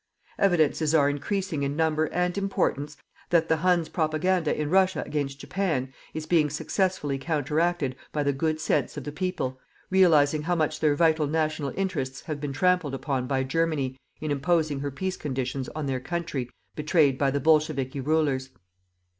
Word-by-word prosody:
Evidences 160 -4 +3
are 145 -2 +4
increasing 175 +2 -2
in 140 0 -1
number 160 0 +2
and 180 +2 -1
importance 150 -7 -1 0.3
that 165 -1 +3
the 160 - +3
Huns' 175 0 +2
propaganda 160 +1 0
in 150 - 0
Russia 190 0 +3
against 140 -2 -3
Japan 145 -7 -2 0.2
is 155 0 -3
being 155 -2 +3
successfully 150 -2 -1
counteracted 155 -1 0 0.2
by 150 - -1
the 140 0 +1
good 155 +3 -1
sense 150 -3 0
of 145 - -4
the 145 - -5
people, 150 -6 -3 0.3
realizing 155 -6 +5
how 175 +4 0
much 155 -1 0
their 150 -2 +3
vital 160 -1 +3
national 155 -2 -1
interests 135 -9 -2
have 150 -3 -5
been 145 -2 -3
trampled 175 -1 +1
upon 135 -1 -2
by 130 0 0
Germany 140 -2 0 0.2
in 155 -1 -3
imposing 150 0 +1
her 145 +1 -2
peace 185 +7 -3
conditions 130 -2 -3
on 155 -2 -3
their 135 -2 -1
country 145 -4 -3 0.3
betrayed 150 -3 +2
by 140 - +3
the 140 +1 0
bolchevikis 145 -3 +1
rulers. 140 -3 +1
150 Hz, 165 wpm, -26 LUFS, 140-165 Hz, 0.3 s, realizing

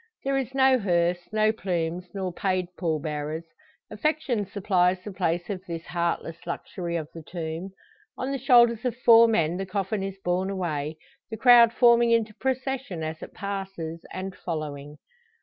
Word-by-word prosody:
There 275 0 0
is 265 -1 -2
no 265 -1 +5
hearse, 175 -3 0
no 215 0 +3
plumes, 180 -4 -3
nor 190 -3 -4
paid 185 -1 0
pall 160 -4 -1
bearers. 150 +1 -4 0.5
Affection 300 - -1
supplies 185 -2 +1
the 210 - -6
place 175 -1 -1
of 190 -3 -5
this 170 -1 -5
heartless 170 -1 -2
luxury 170 0 -4
of 160 -3 -2
the 165 - -8
tomb. 165 +2 -5 0.5
On 260 +2 -3
the 275 - -2
shoulders 240 -3 +5
of 245 -2 -2
four 230 -2 +7
men 170 -6 +1
the 195 - -3
coffin 195 +1 -2
is 195 0 -4
borne 180 +2 0
away, 160 -5 -3 0.3
the 220 - -5
crowd 240 -1 +7
forming 235 -1 +5
into 230 -2 +2
procession 260 -7 -3
as 155 0 -5
it - - -10
passes, 195 -5 -5
and 185 0 -5
following. 150 -3 -5
190 Hz, 165 wpm, -26 LUFS, 170-230 Hz, 0.5 s, four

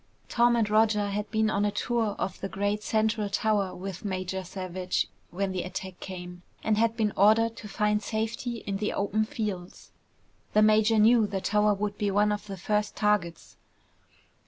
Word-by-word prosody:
Tom 240 0 +4
and 225 -3 +2
Roger 210 -1 +3
had 205 +1 -3
been 220 0 +1
on 200 0 +1
a 205 - +2
tour 220 0 -1
of 185 - -3
the 195 - -4
great 205 +2 -1
central 220 -1 0
tower 205 -2 0
with 190 0 -7
Major 190 -1 -3
Savage 185 0 -2 0.2
when 195 +2 -2
the 185 -1 -2
attack 185 0 -6
came 180 -1 -8 0.2
and 220 - +2
had 225 +1 +1
been 215 -3 +1
ordered 225 +3 +4
to 215 - -8
find 210 +1 0
safety 225 +2 -3
in 195 -1 -2
the 210 +1 -2
open 210 +2 0
fields. 210 -8 -5 0.6
The 215 - +5
major 215 +1 +4
knew 220 0 +5
the 195 -1 -2
tower 210 +2 +2
would 205 0 -3
be 205 - +1
one 205 +1 +3
of 210 0 -3
the 195 -1 -6
first 210 +3 -1
targets. 210 -6 -1
210 Hz, 180 wpm, -28 LUFS, 195-215 Hz, 0.6 s, The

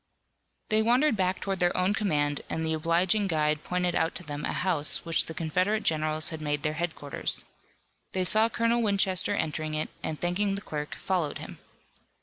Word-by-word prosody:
They 215 0 +3
wandered 245 +4 +3
back 185 -1 0
toward 195 -2 -2
their 175 0 +2
own 185 +2 +2
command 150 -9 0
and 160 - -2
the 160 - +1
obliging 175 +6 +2
guide 155 -3 +1
pointed 180 -1 -1
out 165 0 0
to - - -4
them 145 -2 -5
a - - -1
house 170 -6 +2
which 165 -1 +1
the 160 - -6
Confederate 185 +7 0
generals 155 0 0
had 160 -1 -6
made 145 -1 -1
their 150 - 0
headquarters. 160 -3 -2 0.7
They 185 - +1
saw 215 +5 +3
Colonel 230 +1 +1
Winchester 195 -4 +2
entering 155 0 -2
it, 155 - -1
and 155 - -4
thanking 195 +3 0
the 200 - -3
clerk, 150 -6 -5
followed 175 -6 -1
him. - - -9
175 Hz, 180 wpm, -28 LUFS, 155-195 Hz, 0.7 s, They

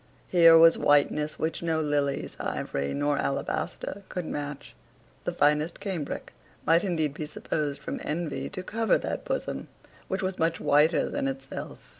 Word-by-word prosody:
Here 165 -2 +8
was 165 0 +7
whiteness 150 +1 +2
which 160 +1 -2
no 165 -2 0
lilies, 145 -2 -1
ivory, 70 0 -2
nor 145 0 0
alabaster 190 +7 -2
could 180 -2 -4
match. 145 -2 -5 0.5
The - - 0
finest 150 +3 +2
cambric 180 -8 -4 0.3
might 165 +3 +4
indeed 160 -7 0
be 150 0 -5
supposed 145 -2 -3
from - - -4
envy 160 0 -3
to 185 -2 -6
cover 225 +3 +2
that - - -4
bosom - - -3 0.4
which 190 0 -2
was 185 0 -2
much 165 0 +1
whiter 150 +3 +3
than 285 -1 -2
itself. 270 0 -6
160 Hz, 150 wpm, -27 LUFS, 145-180 Hz, 0.5 s, Here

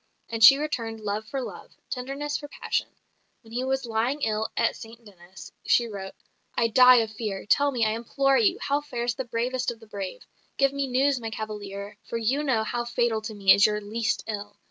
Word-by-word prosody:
And 225 -1 0
she 270 +5 +10
returned 230 -7 -3
love 210 +1 -3
for 275 - -3
love; - - -9 0.2
tenderness 275 +3 -3
for 290 - -4
passion. - - -2 0.6
When 225 0 -15
he 250 +2 -1
was 265 0 -1
lying 235 +6 -1
ill 220 0 0
at 230 - +2
St 230 +1 -12
Denis, 185 -2 -13 0.2
she 240 - +4
wrote, 195 -4 -7 0.4
"I 230 -1 +2
die 250 +2 +8
of 220 -1 -3
fear. 210 -3 -5
Tell 285 +7 +3
me, 240 -5 +1
I 215 - +2
implore 270 +4 +1
you, 395 -3 +3
how 285 - 0
fares 240 -4 -2
the 265 +2 -5
bravest 245 +2 -1
of 235 -2 -6
the 225 - -15
brave. 200 -3 -6 0.3
Give 275 0 +3
me 280 -1 -1
news, 265 +1 +2
my 225 -1 -5
cavalier; 210 -2 -6
for 230 - -5
you 250 +6 0
know 245 -6 +1
how 240 +2 -2
fatal 240 -2 0
to 215 0 -6
me 195 -2 +6
is 200 - +5
your 210 0 -1
least 220 +2 -2
ill. 205 -1 -6
230 Hz, 210 wpm, -26 LUFS, 215-260 Hz, 0.6 s, she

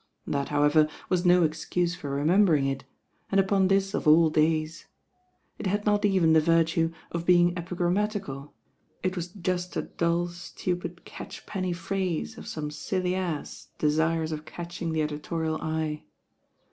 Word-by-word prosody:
That, 140 -1 -2
however, 150 +1 +4 0.2
was 180 0 +1
no 180 0 +6
excuse 170 +2 0
for 145 -5 -6
remembering 155 +2 +3
it, 135 -1 -2 0.5
and 195 - +4
upon 195 0 +3
this 195 0 +2
of - - -1
all 160 +1 +6
days. 155 +1 +1 0.7
It - - -2
had 205 +2 -1
not 205 0 +2
even 185 -5 +4
the 160 - +6
virtue 165 0 +2 0.2
of 170 0 -3
being 175 -1 +5
epi 175 0 -5
grammatical; 175 -6 -2 0.5
it 185 0 0
was 175 -2 -3
just 180 -1 -3
a - - 0
dull, 170 +1 0
stupid 175 0 -5
catchpenny 185 -3 -5
phrase 170 - -2
of - - -10
some 150 -1 -4
silly 180 +4 -2
ass 175 -6 -4
desirous 160 +1 +1
of 155 -1 -4
catching 170 +1 -5
the 160 -1 +1
editorial 155 +1 -3
eye. 155 -1 -2
170 Hz, 150 wpm, -27 LUFS, 155-180 Hz, 0.7 s, no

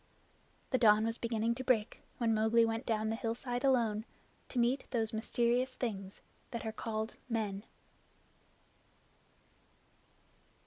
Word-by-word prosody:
The 255 - +3
dawn 215 -2 +6
was 230 +1 -1
beginning 230 0 0
to 260 +2 -5
break 235 -4 +1 0.2
when 230 -2 +2
Mowgli 220 +2 +4
went 225 0 -2
down 220 -1 +1
the - - 0
hillside 245 +2 -3
alone, 230 -6 +2 0.5
to - - -6
meet 245 +3 +1
those 225 -3 -1
mysterious 240 +3 +1
things 195 -5 -4 0.3
that 235 -1 -5
are 220 - -1
called 220 0 -3 0.2
men. 210 -4 -1
230 Hz, 125 wpm, -34 LUFS, 220-240 Hz, 0.5 s, dawn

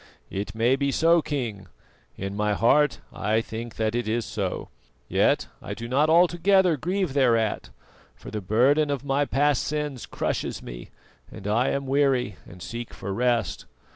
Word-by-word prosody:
"It 100 +3 -4
may 120 +4 +3
be 140 0 0
so, 165 +3 +4
King; 115 -11 -4 0.5
in 100 +1 -4
my 105 0 +1
heart 150 +7 +3
I 110 +2 +1
think 115 0 -6
that 110 0 0
it 120 -1 -1
is 115 +1 0
so; 100 -4 -3 0.4
yet - - +2 0.2
I - - -6
do 115 - -6
not 140 +5 +2
altogether 175 +2 +4
grieve 180 +1 -1
thereat, 115 -6 +2 0.5
for - - -11
the 105 - -3
burden 130 +10 +3
of 140 -1 -2
my 140 +1 +1
past 145 -1 +2
sins 150 -4 -3
crushes - - -3
me, - - -9 0.4
and - - -10
I 115 +5 +2
am 140 0 -1
weary 135 - +1
and 90 0 -11
seek 120 0 -6
for 100 0 -5
rest. 120 +1 0
125 Hz, 165 wpm, -25 LUFS, 110-145 Hz, 0.5 s, so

